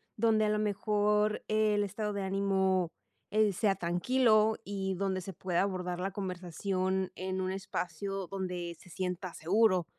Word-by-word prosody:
donde 220 -1 +3
a - - +2
lo 210 - +2
mejor 210 0 +1
el 215 -1 +2
estado 210 +2 -3
de 200 -1 -2
ánimo, 190 -2 +1 0.4
eh, 215 -1 +3
sea 195 +1 +2
tranquilo. 215 +5 +3
Y 190 -1 -2
donde 190 0 -1
se 190 +1 -7
pueda 180 +1 0
abordar 180 -2 -2
la 190 +1 -2
conversación 185 0 -2
en 185 0 -3
un 185 0 -1
espacio 195 0 -3
donde 180 -2 -4
se 180 - -16
sienta 180 +1 -3
seguro, 185 +1 +3
195 Hz, 150 wpm, -31 LUFS, 185-210 Hz, 0.4 s, donde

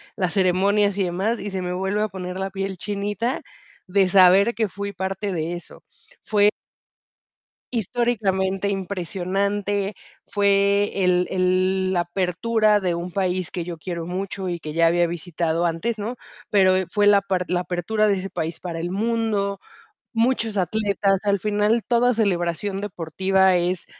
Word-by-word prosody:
las 180 -4 -1
ceremonias 200 +2 +2
y 200 - +2
demás, 190 +6 -1
y 205 0 -5
se 190 - -3
me 180 0 -3
vuelve 190 +3 -1
a 215 - +1
poner 185 -2 -6
la 195 0 -2
piel 195 0 -4
chinita, 205 +6 -2 0.4
de 195 0 +2
saber 195 +4 +6
que 220 -2 +1
fui 200 +2 -5
parte 190 +1 -3
de 165 -1 -2
eso. 175 - -9 0.4
Fue 210 -1 +4 1.2
históricamente 200 -4 0
impresionante, 195 +2 -2 0.3
fue 200 -1 +2
el 180 0 +3
el 185 +1 +1
la 175 -2 +2
apertura 205 +5 +1
de 180 -3 -1
un 170 +1 -5
país 185 -1 -1
que 175 -2 -4
yo 175 -2 -6
quiero 170 0 -5
mucho 190 +2 -4
y 175 -1 -3
que 155 - -6
ya 165 +2 +3
había 175 +1 +3
visitado 170 0 -2
antes, 170 +8 -1
¿no? 225 +5 -3 0.3
Pero, 190 -2 +4
eh, 190 - 0
fue 205 +2 +2
la 205 -1 +7
par 190 -2 -1
la 180 - +1
apertura 185 +5 0
de 205 - +3
ese 195 +1 -4
país 165 -1 -4
para 170 -2 -5
el 170 +1 -3
mundo, 210 -2 -1 0.5
muchos 230 -2 +1
atletas. 195 +1 +1
Al 200 -1 +1
final, 210 +3 +1
toda 245 +1 +3
celebración 195 -2 -1
deportiva 190 0 +1
es 180 +1 0
195 Hz, 160 wpm, -23 LUFS, 180-205 Hz, 1.2 s, la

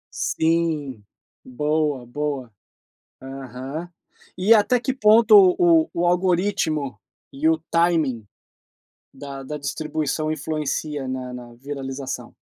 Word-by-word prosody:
Sim. 160 -8 -1 0.4
Boa, 150 0 -1
boa. 135 -3 -4 0.7
Aham. 135 +5 -7 0.5
E 200 +5 +5
até 220 +3 +4
que 265 +1 -2
ponto 220 -2 +5 0.2
o 165 -2 +4
o 175 +1 0
algoritmo 175 - 0 0.3
e 145 +4 0
o 160 - +3
timing 160 -10 +1 0.9
da 140 0 -8
da 150 +2 -5
distribuição 155 +1 -2
influencia 150 -2 -3
na 130 -1 -4
na 120 -1 -10
viralização? 135 0 -6
150 Hz, 100 wpm, -23 LUFS, 135-170 Hz, 0.9 s, E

